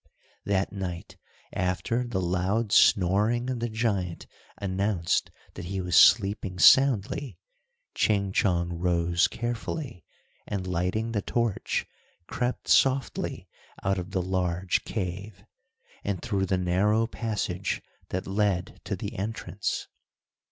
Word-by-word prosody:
That 100 -1 0
night 90 -4 -6 0.4
after 95 +7 -1
the 100 -6 -2
loud 95 +5 0
snoring 105 +9 +4
of 125 - -3
the 120 0 -2
giant 100 -6 -1 0.3
announced 95 -2 0 0.2
that 90 - -7
he 95 +2 -3
was 90 -2 -1
sleeping 95 -1 +5
soundly, 130 +4 +4 0.6
Ching 100 -2 +1
Chong 85 -3 +1
rose 85 -1 +2
carefully, 120 - -4 0.4
and 100 -3 -3
lighting 90 +6 -1
the 105 -3 -1
torch, 115 0 -1 0.4
crept 125 +5 -3
softly 135 -1 +2 0.4
out 95 0 +1
of 90 0 -6
the 95 -2 -1
large 90 -1 0
cave, 95 0 -5 0.6
and 100 -3 -2
through 100 -5 -1
the 95 - +1
narrow 100 +5 +2
passage 105 -5 -2 0.3
that 95 - -3
led 95 -2 -1
to - - -2
the - - -6
entrance. 100 0 -3
95 Hz, 115 wpm, -27 LUFS, 90-110 Hz, 0.6 s, sleeping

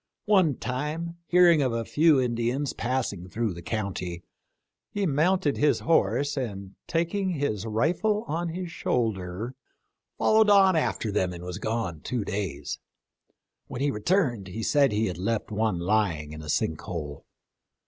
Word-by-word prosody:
One 185 -9 +4
time, 150 +8 -4
hearing 175 -3 +6
of 130 -4 +1
a 115 0 -2
few 155 +1 +4
Indians 120 +2 -1
passing 120 -8 -2
through 110 0 -1
the 85 - -9
county, 90 -4 -4 0.7
he 205 -1 -1
mounted 160 +1 +2
his 150 0 +2
horse, 140 -1 +2
and 100 -7 -4
taking 180 +4 0
his 115 - -2
rifle 175 - +1
on 165 +3 -2
his 175 +1 -5
shoulder, 110 - -2 0.6
followed 220 -1 +4
on 195 -2 +6
after 120 -8 0
them 95 -3 0
and 85 0 -8
was 90 -1 -5
gone 110 -8 -2
two 120 -5 -2
days. 100 -8 -4 0.9
When 125 - -6
he 145 0 +2
returned 120 - 0
he 110 +5 -5
said 140 +2 +3
he 105 -3 0
left 105 +6 -2
one 105 -3 0
lying 85 -5 0
in 80 - -8
a 75 - -9
sink 80 +1 0
hole. 75 -7 -6
120 Hz, 150 wpm, -27 LUFS, 100-160 Hz, 0.9 s, hearing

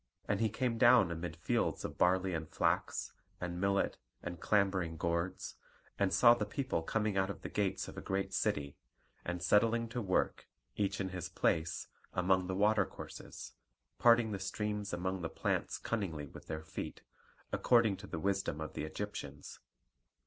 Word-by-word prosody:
And 100 - +1
he 110 -1 +2
came 115 +1 -1
down 120 -7 +7
amid 85 -1 -4
fields 85 - 0
of - - -6
barley 95 +1 +3
and 80 -2 -3
flax, - - 0 0.3
and 90 0 -4
millet, 100 0 +1 0.2
and 85 - -5
clambering 95 -6 +1
gourds; 85 +3 -2 0.4
and 100 -2 +3
saw 120 +3 +7
the 120 -3 -1
people 115 -3 -1
coming 105 +3 0
out 95 0 +2
of 100 - -6
the - - -4
gates 100 -2 -1
of - - -7
a - - -7
great 95 0 -2
city, 70 -1 0 0.5
and 90 0 -3
setting 115 +2 +4
to 120 +1 -3
work, 95 -4 0 0.3
each 100 - 0
in 95 -1 -1
his 90 -2 -5
place, 80 0 0 0.3
among 90 0 +2
the 95 - -2
water 105 +2 +3
courses, - - -9 0.5
parting 115 -2 +5
the 100 - -3
streams 105 +1 -2
among 95 +1 -2
the 80 - -2
plants - - -1
cunningly 90 -10 -2
with 70 - -12
their 80 0 -4
feet, 80 - -6 0.5
according 115 -5 +4
to - - -10
the - - -4
wisdom 95 -3 0
of 80 - -5
the 75 - -3
Egyptians. 75 -6 -6
95 Hz, 170 wpm, -34 LUFS, 85-105 Hz, 0.5 s, down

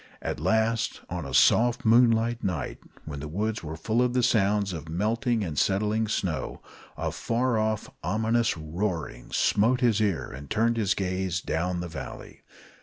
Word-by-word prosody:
At - - -3
last, 110 +6 +1
on 85 -5 -3
a - - -7
soft 120 +2 +4
moonlight 115 0 +4
night, 90 -6 -2 0.3
when 75 -2 -6
the 75 - -5
woods 105 +7 -2
were 80 0 -5
full 110 +9 0
of 125 -1 +1
the 125 -1 +2
sounds 105 -4 +2
of 80 -1 -7
melting 110 +6 0
and 80 -6 -2
settling 105 +3 +1
snow, 90 -6 -2 0.4
a - - -2
far 120 0 0
off, 110 -1 -1 0.2
ominous 110 +4 +1
roaring 80 - -4
smote 120 +5 +2
his 115 -4 +3
ear 100 -6 0
and 70 +2 -9
turned 115 +1 +1
his 105 -3 +1
gaze 95 -2 -1
down 90 0 -1
to 85 - -3
the 90 - -4
valley. 80 - -8
105 Hz, 170 wpm, -27 LUFS, 85-115 Hz, 0.4 s, soft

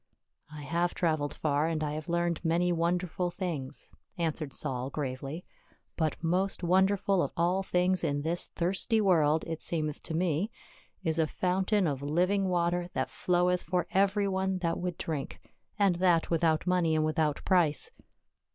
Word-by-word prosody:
" - - -55
I 150 -1 -8
have 170 +4 0
traveled 155 -4 0
far, 150 0 +1
and 160 -2 -1
I 150 -1 -2
have 155 +1 -6
learned 170 -1 0
many 175 +2 +2
won 170 +1 +2
derful 180 0 -2
things," 170 -8 -5 0.3
answered 160 -3 -2
Saul 130 -1 -3
gravely, 140 +3 -4 0.5
"but 160 0 -1
most 185 +3 0
wonderful 190 +1 +3
of - - -1
all 175 +3 +2
things 180 -1 +1
in 145 0 0
this 170 +2 -1
thirsty 195 +6 0
world, 160 -6 +3
it 165 -1 -5
seemeth 155 -3 -2
to 160 - -5
me, 175 +3 0 0.5
is 160 -2 0
a 160 - +3
fountain 190 +4 +1
of 140 -4 -1
living 180 +7 +1
water, 175 0 0
that - - -1
floweth 180 0 +1
for 180 +1 -1
every 200 +1 +2
one 190 0 0
that 170 -2 -1
would 180 -1 -3
drink 150 -4 -4 0.2
— - - -45
and 195 -4 +3
that 175 -3 +2
without 165 -1 +2
money 180 -3 +2
and 155 0 +2
without 155 -1 0
price." 170 -6 +3
170 Hz, 170 wpm, -30 LUFS, 155-180 Hz, 0.5 s, wonderful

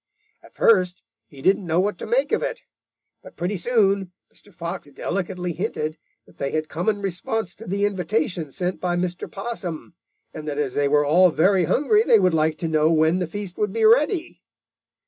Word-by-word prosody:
At - - -19
first 185 -5 +3 0.2
he 135 -2 -14
didn't 190 -1 +2
know 165 +1 +2
what 205 +3 0
to - - -6
make - - +1
of - - +2
it, - - -3 0.6
but - - -14
pretty 180 +4 -2
soon 195 -2 +1 0.2
Mr. 205 - -13
Fox 170 -3 -6
delicately 180 +4 -3
hinted 155 0 -3 0.3
that - - -22
they 140 - -2
had 155 +1 -2
come 175 +6 -1
in 205 -2 -2
response 195 +2 -2
to 225 - -12
the 200 +2 0
invitation 175 -5 -1
sent 180 +5 -3
by 175 -1 0
Mr. 175 0 -3
Possum, 195 -6 -6 0.4
and 155 0 -8
that 145 -1 -3
as 140 -4 -1
they 145 0 +1
were 145 +1 +3
all 180 +5 +5
very 185 +2 +3
hungry, 360 - +3
they 235 - +5
would 185 -4 +2
like 155 0 +1
to 165 - -3
know 155 0 +2
when 160 +2 +3
the 180 - -2
feast 195 0 -7
would 210 -2 0
be 225 -1 +2
ready. 300 - +2
180 Hz, 195 wpm, -23 LUFS, 160-205 Hz, 0.6 s, all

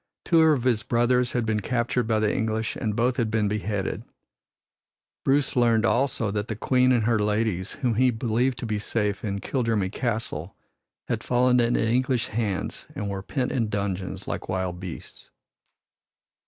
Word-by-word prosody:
Two 165 -2 +5
of 155 -6 +4
his 120 -4 +2
brothers 120 +2 +1
had 120 -2 0
been 110 -1 0
captured 120 +2 0
by 110 -1 +2
the 110 -1 +1
English 110 0 -1
and 105 -2 -2
both 125 +2 +1
had 115 -4 +1
been 110 -1 +1
beheaded. 105 -1 -2 1.2
Bruce 140 0 +2
learned 120 -2 +3
also 120 -3 +1
that 105 +1 -2
the 110 - -3
Queen 125 +4 +3
and 120 -3 +3
her 115 0 +2
ladies 105 -2 0
whom 125 -3 -1
he 125 +3 +4
believed 120 +2 0
to 120 - -4
be 110 -2 -1
safe 105 -1 -1
in 100 -2 -2
Kildrummy 115 -7 0
Castle 110 -8 -3 0.5
had - - -2
fallen 125 0 +3
into 120 -1 +2
English 125 0 +1
hands 105 -3 -3
and 100 -1 -3
were 95 -1 -4
pent 125 +6 -2
in 115 -6 0
dungeons 100 -2 -3
like - - -4
wild 95 -2 -2
beasts. 90 -3 -9
115 Hz, 170 wpm, -25 LUFS, 105-125 Hz, 1.2 s, Two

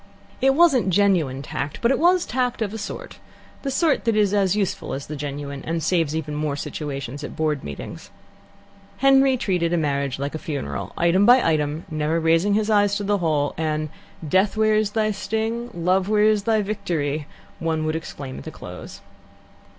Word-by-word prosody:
It 270 +1 +4
wasn't 280 - +4
genuine 175 -9 +2
tact, 140 +1 -4
but 235 - +2
it - - +1
was 350 +2 +4
tact, 250 -2 -1
of 205 -1 -4
a 220 - -5
sort - - -7 0.4
the 275 - -3
sort 290 +1 +1
that 230 -2 +2
is 205 -2 +3
as 195 -2 +2
useful 200 -1 -2
as 135 - -6
the 150 - -6
genuine, 140 -1 -5
and 165 0 -2
saves 165 -4 +1
even 155 -2 -3
more 150 -1 -1
situations 140 -2 -5
at - - -6
Board 155 -3 -1
meetings. 70 -1 -8 0.9
Henry 270 0 +5
treated 175 -6 0
a - - +2
marriage 140 -4 -1
like 140 +1 -3
a 155 - -4
funeral, 70 - -4
item 180 +5 +3
by 245 -3 +6
item, 155 0 0
never 155 +2 0
raising 165 +5 +3
his 215 0 +1
eyes 205 -1 +3
to 205 - -2
the 205 0 +1
whole, 150 -4 0
and 155 -1 -1 0.4
"Death, 190 +7 +2
where 215 0 +3
is 215 -1 +2
thy 215 -1 +1
sting? 220 +4 -2
Love, 185 +3 +1
where 210 -1 +3
is 215 -1 +3
thy 220 -2 +2
victory?" 160 -8 -2 0.3
one 160 -1 -1
would 155 0 -1
exclaim 140 -5 -6
at - - -10
the - - -6
close. - - -10
180 Hz, 190 wpm, -23 LUFS, 150-215 Hz, 0.9 s, by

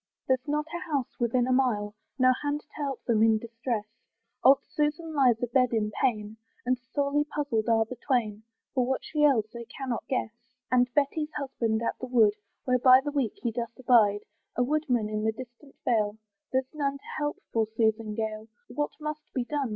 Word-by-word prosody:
There's 260 +2 +1
not 300 +1 0
a - - -2
house 275 -4 -2
within 240 +1 +2
a 255 - 0
mile. 230 -6 +1 0.2
No 255 -1 +5
hand 290 0 -1
to 300 - -34
help 280 -3 -3
them 225 -3 +2
in 220 -1 +5
distress: 230 -1 -3 0.6
Old 270 +1 +6
Susan 310 +2 -1
lies 250 -5 +3
a - - +4
bed 250 +1 +2
in 215 -2 0
pain, 215 -3 -1 0.3
And 250 0 +1
sorely 280 +3 0
puzzled 285 -7 -1
are 225 -1 +4
the 250 +3 -8
twain, 220 -4 0 0.3
For 255 - +2
what 260 +1 -1
she 300 - -2
ails 250 -8 +4
they 235 0 -7
cannot 255 -1 -5
guess. 255 -4 -1 0.4
And 250 -1 +3
Betty's 300 +2 0
husband's 235 -5 -1
at - - -2
the 255 - -5
wood, 225 -5 +4 0.3
Where 250 -1 +2
by 255 +1 +7
the 290 +1 -3
week 270 -7 0
he 235 - 0
doth 235 0 -5
abide, 220 -5 +4 0.3
A 250 - +2
woodman 255 -5 +1
in 215 0 -2
the 220 0 +1
distant 255 +3 -12
vale; 215 -3 +1 0.3
There's 260 +1 -1
none 280 -2 -1
to - - -23
help 295 0 -1 0.2
poor 225 -1 +2
Susan 220 -1 0
Gale, 220 0 -3 0.2
What 295 +4 -1
must 305 0 -6
be 250 -2 0
done? 280 -1 -2
250 Hz, 195 wpm, -28 LUFS, 225-280 Hz, 0.6 s, by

